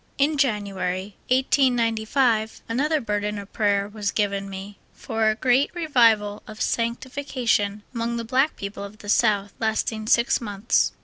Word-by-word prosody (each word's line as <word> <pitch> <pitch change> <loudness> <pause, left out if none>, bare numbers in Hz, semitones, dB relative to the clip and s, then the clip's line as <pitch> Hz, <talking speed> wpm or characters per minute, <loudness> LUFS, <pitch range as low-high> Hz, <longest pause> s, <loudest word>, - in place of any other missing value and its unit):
In 290 +3 +2
July, 200 -7 -1 0.2
1895, 240 -3 +2
another 295 +7 +1
burden 210 -3 -2
of 200 0 -9
prayer 200 -2 +1
was 210 -1 -3
given 200 -1 -1
me 195 +1 -8 0.2
for 225 -1 0
a 215 - +1
great 255 +4 +2
Revival 230 -10 +3
of 215 0 -10
sanctification 235 -3 -1
among 235 0 -2
the 230 - -4
black 260 +6 +2
people 200 0 -6
of 200 +1 -9
the 205 - -10
South, 205 -2 +2
lasting 220 0 -1
six 235 +2 +3
months. 205 0 +1
220 Hz, 140 wpm, -24 LUFS, 205-245 Hz, 0.2 s, Revival